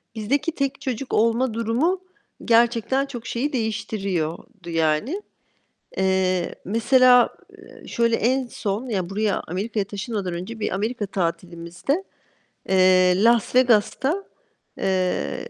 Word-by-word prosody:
Bizdeki 260 +9 0
tek 275 -3 -3
çocuk 260 0 -4
olma 230 +2 +2
durumu 235 - 0 0.5
gerçekten 235 +3 +3
çok 245 -5 -8
şeyi 270 +5 -2
değiştiriyordu 195 -6 -3
yani. 165 - 0 0.8
Eee, 190 -2 +1
mesela, 245 +4 +5 0.3
eee, - - -15
şöyle 235 -1 +1
en 255 +3 +1
son, 220 +2 -4
ya, 190 -6 -2
buraya, 210 +1 0
Amerika'ya 200 +4 -2
taşınmadan 200 -2 -4
önce 185 +7 -6
bir - - -2
Amerika 215 +3 -2
tatilimizde, 175 - -3 0.7
eee, 185 -1 +5
Las 235 0 +3
Vegas'ta, 255 - +2 0.5
eee, 190 - -1
220 Hz, 110 wpm, -23 LUFS, 185-250 Hz, 0.8 s, mesela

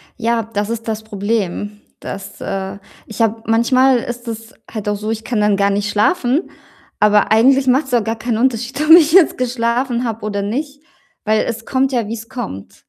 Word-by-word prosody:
Ja, 230 -1 0
das 205 +1 -1
ist 230 -1 -4
das 220 -1 -3
Problem, 205 -1 -3 0.2
dass 195 +1 -8
äh, 195 0 -4 0.3
ich 220 +1 -6
habe 225 0 +1
manchmal 255 +3 +3
ist 240 +1 -7
es 225 0 -7 0.2
halt 215 -2 -6
auch 205 - +1
so, 215 +2 -4
ich 225 0 -4
kann 225 -4 -1
dann 210 -1 +2
gar 200 0 +2
nicht 205 +1 -1
schlafen, 250 - +1 0.5
aber 210 0 +3
eigentlich 260 +4 +4
macht's 265 +1 +2
auch 235 -3 +3
gar 225 +1 -2
keinen 225 0 -2
Unterschied, 245 +2 -1
ob 310 +1 +2
ich 325 -2 +8
jetzt 360 -1 +5
geschlafen 245 0 -1
habe 225 -2 -4
oder 200 -1 -2
nicht, 280 +8 -4 0.4
weil 215 0 +2
es 230 -1 -5
kommt 265 0 0
ja, 235 -4 -1
wie's 225 +1 -7
kommt. 225 - -7
225 Hz, 190 wpm, -18 LUFS, 210-250 Hz, 0.5 s, ich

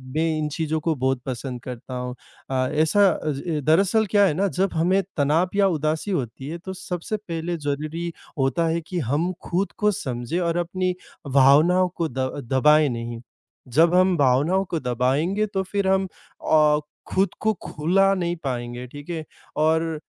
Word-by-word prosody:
मैं 160 +1 +2
इन 150 -1 -1
चीज़ों 160 -1 -1
को 160 0 0
बहुत 130 0 0
पसंद 125 -1 -5
करता 125 0 -8
हूँ। 125 0 -4 0.3
अ, 130 -1 +1
ऐसा 175 +7 +4
अ, 155 -2 -2
ज 155 +2 -3
दरअसल 195 +7 +3
क्या 205 -1 +5
है 175 - +2
ना, 195 +6 +1
जब 190 +1 -1
हमें 180 +4 +2 0.2
तनाव 155 +5 +2
या 200 -1 +4
उदासी 155 +3 -1
होती 130 - -3
है, 165 +3 -4
तो 190 +2 -7
सबसे 180 +3 -4
पहले 170 -3 -4
ज़रूरी 155 +3 -3 0.3
होता 135 +5 +1
है 165 +1 0
कि 175 +2 -4
हम 155 +9 0
खुद 185 +3 -1
को 210 -1 +3
समझें 130 - -3
और 170 -1 0
अपनी 180 +1 -1 0.4
भावनाओं 155 +7 +5
को 165 - -1
द 130 - -6 0.3
दबाएँ 150 +3 +5
नहीं। 115 -1 -5 0.5
जब 165 +3 +5
हम 185 0 +4
भावनाओं 145 +8 +3
को 165 - -1
दबाएँगे, 135 - 0
तो 195 -2 -2
फिर 195 +1 -2
हम 190 0 +2 0.4
अ, 150 -1 +5 0.3
खुद 195 +1 +1
को 220 0 +2
खुला 195 +6 +2
नहीं 175 -1 -1
पाएँगे, 120 -1 -4
ठीक 145 +5 -11
है। 160 -2 -3 0.3
और, 160 +1 +1
160 Hz, 175 wpm, -23 LUFS, 140-185 Hz, 0.5 s, क्या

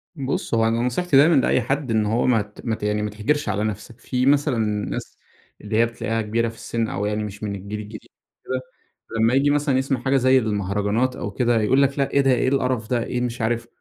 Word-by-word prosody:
بُص، 135 -5 -3
هو 115 -1 +3
أنا 115 +1 0
نصيحتي 135 +5 +1
دايمًا 155 +4 +6
لأي 130 -1 +3
حد 135 +2 -2
إن 110 -1 +2
هو 110 +3 +1
ما 105 -4 +1
مات 110 -4 -3
يعني 105 0 0
ما 105 - -2
تحْجرش 110 +6 -1
على 105 0 -1
نفسك. 110 +2 -5
في 125 +2 -1
مثلًا 140 -1 +3 0.3
ناس - - -6 0.4
اللي 105 +1 -2
هي 115 - +5
بتلاقِيها 115 -1 -3
كِبيرة 115 +2 0
في 115 - -11
السن 115 0 -3
أو 100 0 -3
يعني 105 +1 -1
مش 105 0 -7
من 100 -1 -2
الجيل 100 +2 -6
الجديد 105 +1 -10 0.4
كده، 130 0 -2 0.6
لما 115 +2 +3
ييجي 135 +2 +3
مثلًا 145 -2 +2
يسمَع 135 -1 0
حاجة 135 +3 +1
زي 130 0 +4
المهرجانَات 105 +3 -1
أو 105 - -5
كده 120 +1 +1
يقول 130 +6 +3
لك: 140 +1 +1
"لأ، 135 - 0
إيه 140 - +3
ده؟ 135 -1 +3
إيه 125 0 +2
القرَف 125 -4 0
ده؟ 120 -2 +1
إيه 125 +1 -3
مش 125 0 -3
عارف؟" 115 +1 -1
115 Hz, 225 wpm, -22 LUFS, 105-130 Hz, 0.6 s, دايمًا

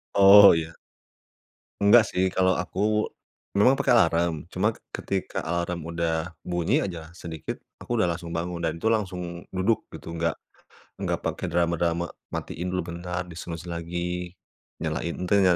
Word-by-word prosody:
Oh, 100 0 +10
iya. 80 0 -3 1.1
Enggak 110 +2 +7
sih, 90 - 0
kalau 95 0 +3
aku, 90 +2 -4 0.8
memang 125 +6 +6
pakai 135 -1 +1
alarm, 85 -3 +1
cuma 100 +5 +1 0.2
ketika 95 -1 -3
alarm 85 +1 -2
udah 85 0 -1 0.2
bunyi 85 -1 +2
aja 85 -4 -5
sedikit, 80 -3 -7 0.2
aku 120 -2 -1
udah 100 - +3
langsung 85 -1 -8
bangun, 85 0 -3
dan 80 0 -1
itu 110 - -1
langsung 90 -6 -1
duduk, 95 +4 +1
gitu. - - -10
Enggak 85 0 -1 0.6
enggak - - -1
pakai - - -2
drama-drama 85 0 +1 0.3
matiin 90 +2 -4
dulu 90 0 -1
bentar, 90 +1 -4
di-snooze 85 0 -7
lagi, 85 +1 -3 0.5
nyalain 85 +2 -2
te 90 - 0
n - - +4
85 Hz, 145 wpm, -26 LUFS, 85-95 Hz, 1.1 s, Oh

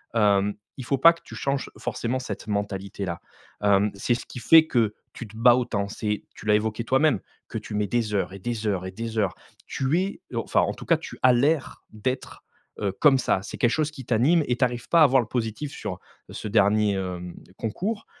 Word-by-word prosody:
hem, 105 -2 +3 0.2
il 130 - -6
faut 140 - 0
pas 165 +4 +8
que 170 - -18
tu - - -11
changes 140 0 -2
forcément 120 +2 -2
cette 110 -4 -6
mentalité-là. 100 -3 -3 0.4
Hem, 100 0 +3
c’est 120 +5 0
ce - - -7
qui - - -8
fait 160 +7 +7
que 115 -7 +1 0.2
tu 120 - -8
te 110 +2 -13
bats 120 +1 +6
autant. 115 -5 -1
C’est 105 0 -3
tu - - -12
l’as 105 - +5
évoqué 110 +2 -1
toi-même, 140 +5 +3 0.3
que 115 - -4
tu 105 0 -7
mets, 105 -1 0
des 110 0 -1
heures 95 -1 -1
et 95 - -8
des 115 +2 -4
heures 95 -3 -1
et - - -6
des 115 +3 -6
heures. 100 -4 0 0.3
Tu 140 +5 0
es 195 +1 -4
heu - - -1
enfin - - +1
en - - 0
tout - - -11
cas - - +3
tu - - -9
as 130 - +7
l’air 140 +4 +1
d’être, 130 +5 -4 0.4
heu, 100 -2 0
comme 135 +5 +4
ça. 95 - +1
C’est - - -7
quelque 120 - +4
chose 155 -1 0
qui 135 -4 -10
t’anime 130 +10 +3
et 125 - 0
tu 130 - +4
arrives 120 -1 -5
pas 170 -2 +6
à - - +8
voir 135 -1 +4
le 115 - -7
positif 120 +4 -3
sur 95 -4 -5 0.3
ce - - -6
dernier, 105 0 +3
hem, 90 -2 -5 0.2
concours. 200 - -3
115 Hz, 225 wpm, -25 LUFS, 105-130 Hz, 0.4 s, pas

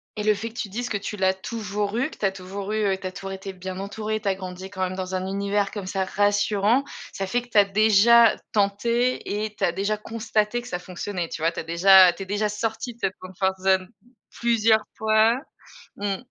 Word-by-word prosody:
et 210 - -3
le 215 - +4
fait 225 +3 -5
que 225 - -20
tu 205 - -3
dises 245 +5 -4
que 205 - -1
tu 205 +1 -6
l'as 190 0 +3
toujours 205 +1 -4
eu, 265 +5 0
que - - -13
tu - - -2
as 195 - +2
toujours 195 +2 -6
eu 215 0 0
que 195 -2 +1
tu 185 - -3
as - - -5
toujours 195 0 -7
été 195 0 -6
bien 185 0 -7
entouré, 215 +2 -3
tu 205 - -5
as 190 - +2
grandi 185 0 -8
quand 190 -1 -7
même 185 0 -2
dans 185 0 -4
un 185 - -2
univers 200 +1 -1
comme 200 -3 -6
ça 190 0 -1
rassurant, 205 +4 +2 0.3
ça 195 - -3
fait 245 +4 0
que 245 - -17
tu 215 - -1
as 200 - +7
déjà 215 +3 +5 0.2
tenté 215 +1 0
et 215 -1 -7
tu - - -5
as 170 - +3
déjà 200 +4 -1
constaté 220 +1 -1
que 240 - -12
ça 180 - -3
fonctionnait, 180 -1 -5
tu 155 - -6
vois? 165 +1 +2
Tu - - -6
as - - -9
déjà 180 +2 +7
tu 195 - -7
es - - -9
déjà 205 +2 0
sorti 225 +3 -3
de 235 - -26
cette 190 - -1
comfort 190 +1 -2
zone 190 -1 +3 0.4
plusieurs 225 -2 +2
fois. 220 +2 +3 0.6
Mmh. 200 -1 -2
200 Hz, 240 wpm, -24 LUFS, 190-220 Hz, 0.6 s, as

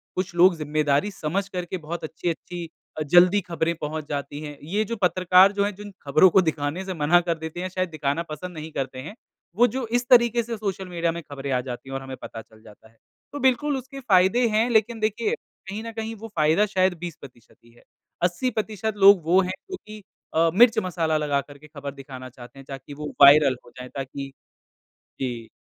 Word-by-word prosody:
कुछ 185 -1 -2
लोग 175 +1 +6
ज़िम्मेदारी 150 +3 0
समझ 190 +3 -2
करके 180 0 -4
बहुत 170 +1 -6
अच्छी-अच्छी 170 +1 -5 0.3
अ, - - 0
जल्दी 175 +6 +5
ख़बरें 170 -2 -1
पहुँच 150 0 -4
जाती 145 0 -4
हैं। 150 -1 -8
ये 200 +8 -1
जो 230 - -4
पत्रकार 185 +1 +5
जो 200 0 0
हैं 205 - -2
जिन 205 +1 -10
ख़बरों 155 +6 +5
को 190 - +5
दिखाने 160 +2 -2
से 190 - -4
मना 165 +1 +4
कर 170 -1 -2
देते 160 +1 -7
हैं 185 - -3
शायद 185 0 -2
दिखाना 155 0 -2
पसंद 180 +4 -6
नहीं 155 +1 -7
करते 135 -3 -4
हैं, 155 +11 -8 0.4
वो 240 +4 +5
जो 260 0 -3
इस 240 +2 -1
तरीक़े 235 -1 +5
से 230 0 -5
सोशल 195 -2 -4
मीडिया 170 -1 -1
में 170 +1 -6
ख़बरें 140 -2 -6
आ 125 -1 +1
जाती 125 +1 -8
हैं - - -7
और 135 - -3
हमें 135 -1 -8
पता 115 - -8
चल 110 0 -21
जाता 110 0 -17
है। 115 - -30 0.4
तो 290 - -4
बिल्कुल 270 +2 +2
उसके 265 +1 -8
फ़ायदे 210 0 +3
हैं 220 +3 +2
लेकिन 225 0 +2
देखिए, 220 - 0 0.4
कहीं 210 +3 -5
न 230 - -6
कहीं 225 0 -5
वो 225 +1 -9
फ़ायदा 160 +5 +3
शायद 190 -2 +1
20% 140 -9 -10
ही 120 - -20
है 120 - -23 0.4
80% 215 +2 -1
लोग 200 -2 +7
वो 175 +3 +4
हैं 185 -1 -2 0.2
जो - - -2
कि 215 0 -10 0.3
अ, 165 +1 +3
मिर्च 230 +3 +6
मसाला 165 -4 0
लगाकर 145 -1 -2
के 150 +2 -16
ख़बर 140 -2 -7
दिखाना 130 -2 -10
चाहते 125 +2 -14
हैं, 135 - -12
ताकि 135 +1 -8
वो 150 +1 -6
वायरल 140 -1 +8
हो 120 - -16
जाएँ 125 0 -8
ताकि 135 0 -6 0.9
जी। 120 -4 -4
170 Hz, 210 wpm, -24 LUFS, 145-205 Hz, 0.9 s, वायरल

